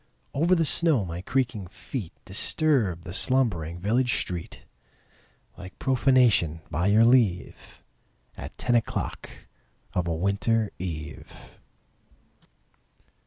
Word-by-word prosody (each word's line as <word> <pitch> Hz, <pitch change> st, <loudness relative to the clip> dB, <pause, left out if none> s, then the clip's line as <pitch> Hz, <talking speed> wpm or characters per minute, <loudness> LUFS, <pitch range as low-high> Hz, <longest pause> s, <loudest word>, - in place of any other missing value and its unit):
Over 170 Hz, +6 st, +3 dB
the 165 Hz, -2 st, +2 dB
snow 150 Hz, -, +2 dB
my 85 Hz, 0 st, -5 dB
creaking 115 Hz, -3 st, -1 dB
feet 95 Hz, +2 st, -7 dB
Disturbed 105 Hz, -, 0 dB
the 90 Hz, -, -8 dB
slumbering 100 Hz, -10 st, +1 dB
village 115 Hz, +7 st, +1 dB
street 90 Hz, -2 st, -6 dB, 0.9 s
Like 90 Hz, +1 st, -10 dB
profanation, 125 Hz, -, +3 dB
by 85 Hz, +4 st, 0 dB
your 110 Hz, +3 st, +5 dB
leave, 115 Hz, -8 st, +1 dB, 0.5 s
At -, -, -9 dB
ten 120 Hz, -, 0 dB
o'clock 120 Hz, -1 st, -1 dB, 0.6 s
of 90 Hz, -1 st, -1 dB
a 85 Hz, -, -1 dB
winter 100 Hz, +5 st, 0 dB
eve. 75 Hz, -5 st, -6 dB
100 Hz, 105 wpm, -26 LUFS, 90-130 Hz, 0.9 s, your